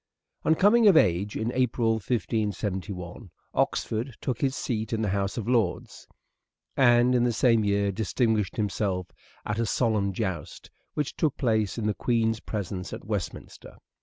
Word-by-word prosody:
On 160 - +3
coming 215 +6 +5
of 190 -5 +7
age, 95 - +2
in 110 +2 -1
April 125 -2 +1
1571, 105 -4 -3 0.2
Oxford 115 +2 -1
took 130 - -3
his 135 -1 +1
Marriage, 110 -5 -2
seat - - -6
in 110 0 0
the 105 - 0
House 100 +2 -1
of 115 -2 -3
Lords, 115 -7 -1 0.7
and 120 -1 +5
in 125 -1 +3
the 120 - +2
same 115 -1 +3
year 100 0 +1
distinguished 110 0 0
himself 100 -3 -2 0.3
at 105 +1 -2
a 115 - +1
solemn 105 -4 +1
joust 95 -6 -5 0.2
which 150 -2 -2
took 150 -3 0
place 110 -5 0
in 115 - -2
the 105 - +1
Queen's 115 -1 0
presence 95 -4 -5
at - - -8
Westminster. 105 -4 -5
110 Hz, 160 wpm, -27 LUFS, 100-120 Hz, 0.7 s, of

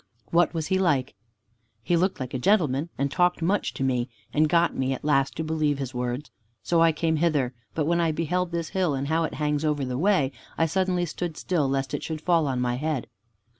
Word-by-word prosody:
"What 170 0 +4
was 160 -2 -3
he 190 +4 +1
like?" 140 -8 +1 0.7
"He 175 - +1
looked 185 +1 +1
like 130 -2 -5
a 130 - -1
gentleman, 155 -3 +2
and 140 0 0
talked 175 +1 +2
much 195 +4 +1
to - - -2
me, 125 -1 0 0.2
and 155 +1 +3
got 170 +1 +3
me 130 0 0
at 130 - -7
last 135 -3 +2
to 160 - -2
believe 155 -2 0
his 135 -2 -4
words. 125 +3 -3 0.3
So 170 -1 +2
I 165 0 +6
came 160 +1 0
hither, 150 -6 +1 0.2
but 155 - 0
when 170 +2 +2
I 165 -1 +2
beheld 170 +3 -1
this 170 -1 -2
hill 180 -6 0
and 135 +1 -3
how 165 +1 +2
it - - -5
hangs 150 0 0
over 150 -3 0
the 125 0 -3
way, 180 -7 +3 0.3
I 165 - +3
suddenly 180 +1 0
stood 165 0 -5
still 155 -7 0
lest 135 0 -1
it - - -2
should 160 -1 -4
fall 165 -3 +2
on 130 -2 -1
my 125 0 0
head." 150 -2 -2
155 Hz, 225 wpm, -26 LUFS, 135-170 Hz, 0.7 s, I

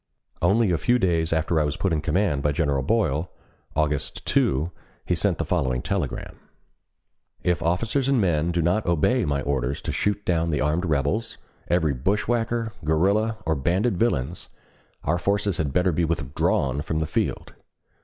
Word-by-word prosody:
Only 100 +3 +3
a 85 - +1
few 125 0 +3
days 85 -7 +1
after 80 0 +1
I - - +3
was 75 -1 -2
put 95 -4 0
in 75 - 0
command 85 -3 +1
by 75 +1 +1
General 70 -3 +1
Boyle. 90 - 0 0.5
August 75 -2 -1
2, 75 +6 +1 0.3
he - - 0
sent - - +1
the - - -2
following 65 -1 0
telegram: 95 -9 -3 1.0
If 90 -1 +1
officers 115 +11 0
and 135 -3 +3
men 85 -5 +1
do 85 -1 0
not 90 +5 +1
obey 85 - +2
my 70 -2 -1
orders 70 -1 -1
to - - -2
shoot 105 0 -1
down 85 -1 +1
the 75 -3 0
armed 80 +5 0
rebels, 75 - 0 0.3
every 80 -5 +2
bushwhacker, 115 - -1
guerrilla, 100 +8 +2
or 80 - +2
banded 90 - +1
villains, 85 - -1 0.5
our 85 +4 0
forces 100 0 0
had 75 -4 0
better 90 +5 +2
be 85 +2 0
withdrawn 70 -3 0
from 80 +1 -3
the 80 - 0
field. - - -2
85 Hz, 165 wpm, -24 LUFS, 75-100 Hz, 1.0 s, Only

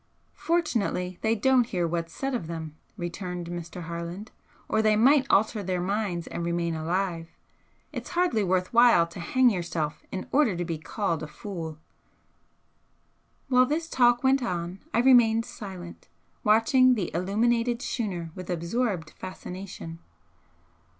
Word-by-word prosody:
"Fortunately 225 - -1
they 220 0 +2
don't 250 +1 +3
hear 180 -6 -1
what's 165 0 -3
said 270 0 -3
of 230 -10 -3
them," 160 -2 -6 0.2
returned 180 0 -5
Mr. 175 0 -6
Harland 170 +5 -6 0.4
"or 220 - +2
they 215 -1 +4
might 270 +5 +5
alter 215 +2 +3
their 185 -2 -2
minds 185 -2 -1
and 170 - -5
remain 170 0 -1
alive. 165 +1 -2 0.6
It's - - -6
hardly 345 - +1
worth 185 +1 0
while 235 -7 +6
to 170 +1 -11
hang 250 +8 +3
yourself 170 -5 -3
in 185 - -5
order 270 -9 +3
to 175 - -2
be 165 -2 -3
called 165 +1 -2
a 155 - -5
fool!" 160 -1 -7 1.7
While 255 -1 +4
this 320 +4 -1
talk 245 -4 +3
went 265 +1 +4
on 180 -4 -3
I - - 0
remained 235 -3 +5
silent, 185 -4 -9 0.4
watching 250 +4 +5
the 195 -7 -2
illuminated 230 +6 +1
schooner 180 -9 -3
with 185 0 -9
absorbed 175 0 -1
fascination. 185 -2 -8
190 Hz, 140 wpm, -27 LUFS, 170-235 Hz, 1.7 s, while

